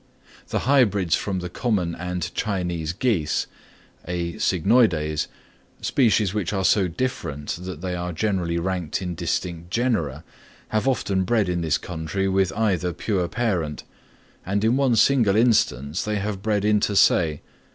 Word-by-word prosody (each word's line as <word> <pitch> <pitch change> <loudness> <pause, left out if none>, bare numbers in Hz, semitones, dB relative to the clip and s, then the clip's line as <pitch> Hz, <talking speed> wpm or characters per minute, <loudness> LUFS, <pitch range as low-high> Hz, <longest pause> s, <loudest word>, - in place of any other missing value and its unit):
The - - -1
hybrids 105 - +3
from 95 -3 -2
the 90 - -5
common 95 -7 0
and 90 0 -4
Chinese 90 -6 -2
geese 90 -6 0 0.6
(A. 85 -1 -2
cygnoides), 90 -6 +2 0.5
species 110 -6 +2
which 100 -4 -1
are 95 -2 -1
so 95 -2 +4
different 80 - -4
that 90 -4 -6
they 90 -1 -3
are 90 0 -3
generally 90 -2 -1
ranked 90 -2 -2
in 90 -1 -3
distinct 85 0 -3
genera, 90 - -1 0.5
have 110 +4 0
often 100 -7 +1
bred 105 +1 +1
in 90 -1 -1
this 80 -2 +1
country 90 +3 -3
with 95 -1 +2
either 95 -5 0
pure 90 0 -1
parent, 90 -10 -2 0.6
and 100 +3 -1
in 115 +3 +3
one 135 -3 +3
single 115 -4 +4
instance 90 - +2
they 105 0 -2
have 100 -1 -3
bred 105 -1 0
inter 105 -1 +2
se. 80 -5 +3
95 Hz, 145 wpm, -23 LUFS, 85-105 Hz, 0.6 s, so